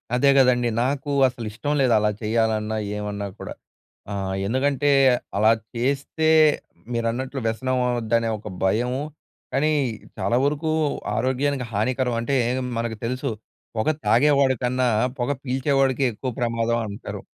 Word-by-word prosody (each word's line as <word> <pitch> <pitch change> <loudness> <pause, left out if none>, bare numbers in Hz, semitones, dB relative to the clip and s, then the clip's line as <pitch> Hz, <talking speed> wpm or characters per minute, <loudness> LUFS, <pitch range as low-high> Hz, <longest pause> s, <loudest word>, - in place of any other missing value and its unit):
అదే 140 +3 +4
కదండీ! 125 -2 +4 0.2
నాకు 140 +2 -2 0.2
అసలు 120 -2 -6
ఇష్టం 145 +7 -2
లేదు. 130 -3 +3
అలా 105 0 +2
చేయాలన్నా, 110 -1 0 0.2
ఏమన్నా 105 -1 -4
కూడా, - - -6 0.6
ఆహ్, 95 -1 -3
ఎందుకంటే 140 +5 +1 0.5
అలా 110 +2 +5 0.2
చేస్తే 140 +6 -1 0.7
మీరన్నట్లు 120 +4 -2
వ్యసనం 130 +3 -1
అవ్వుదనే 115 -1 0
ఒక 105 - -10 0.2
భయము. 120 +7 +1 0.5
కానీ, 145 +4 +2 0.5
చాలా 120 - +1
వరకు 150 +2 0 0.4
ఆరోగ్యానికి 130 +2 0
హానికరం 125 +3 0
అంటే, 135 +4 -1 0.4
మనకు 115 -1 -2
తెలుసు 130 +4 -2 0.5
పొగ 110 - +1 0.2
తాగేవాడి 135 +4 +4
కన్నా, 125 +1 +1 0.3
పొగ 120 +3 0
పీల్చేవాడికె 135 0 +1
ఎక్కువ 130 +5 -4
ప్రమాదం 115 -1 0
అంటారు. 100 0 -7
125 Hz, 120 wpm, -23 LUFS, 115-135 Hz, 0.7 s, అలా